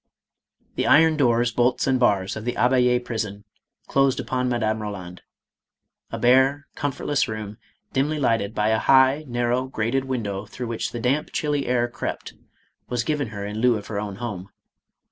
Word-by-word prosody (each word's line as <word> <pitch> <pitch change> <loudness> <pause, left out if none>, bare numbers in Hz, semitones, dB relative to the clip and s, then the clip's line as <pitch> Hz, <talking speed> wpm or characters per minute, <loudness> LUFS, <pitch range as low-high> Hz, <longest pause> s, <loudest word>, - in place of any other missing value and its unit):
The - - 0
iron 160 +1 +6
doors, 120 -4 +2
bolts 120 +2 +1
and 130 -1 +2
bars 100 -5 +2
of 110 - -6
the 120 +1 -2
Abbayd 125 -1 +2
prison 105 -3 -4 0.4
closed 135 -1 +2
upon 125 -1 -1
Madame 110 -3 0
Eoland. 95 -4 -7 0.9
A - - -5
bare, 130 +3 +3
comfortless 145 0 -1
room, 110 -1 -6 0.3
dimly 145 +3 0
lighted 115 -5 0
by 105 +1 +1
a 110 0 +2
high, 135 +4 +4
narrow, 120 +1 0
grated 130 +2 -1
window 105 -6 -3
through 125 +4 -6
which 115 - -3
the 120 - -5
damp, 135 +6 0
chilly 145 -2 -1
air 120 -1 +1
crept, 120 - -5 0.6
was 120 -1 -1
given 145 -1 -1
her 100 -2 -6
in 105 +1 -5
lieu 120 -1 +3
of 105 - -8
her 105 -2 -4
own 100 -2 -5
home. 100 -4 -6
120 Hz, 165 wpm, -23 LUFS, 110-130 Hz, 0.9 s, iron